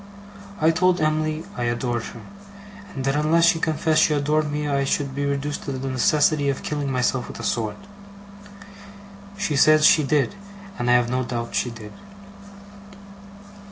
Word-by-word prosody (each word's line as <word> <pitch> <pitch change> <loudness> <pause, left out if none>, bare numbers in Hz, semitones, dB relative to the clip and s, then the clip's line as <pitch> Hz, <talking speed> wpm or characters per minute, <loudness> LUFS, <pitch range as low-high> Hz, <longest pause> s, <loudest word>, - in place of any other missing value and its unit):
I 160 +1 +4
told 180 +2 +2
Em'ly 155 0 -1
I 120 - -3
adored 120 0 -1
her, - - -10 0.7
and 135 -2 -4
that 135 +1 +1
unless 155 +3 +3
she 170 -1 +3
confessed 155 0 +1
she 155 - +3
adored 150 +1 0
me 150 0 -2
I 140 -1 0
should 140 0 -1
be 140 +1 -2
reduced 140 +1 -2
to 140 - -3
the 135 +1 -4
necessity 145 +3 +2
of 135 - -3
killing 145 -2 -3
myself 125 0 0
with - - -9
a - - -7
sword. 110 -3 -2 1.6
She 195 -7 -1
said 155 +2 +5
she 155 - +6
did, 145 +4 +1 0.5
and 120 0 -1
I - - +5
have 120 -1 +2
no 130 0 0
doubt 120 -1 -5
she 125 - 0
did. 110 -3 -10
145 Hz, 165 wpm, -23 LUFS, 130-155 Hz, 1.6 s, she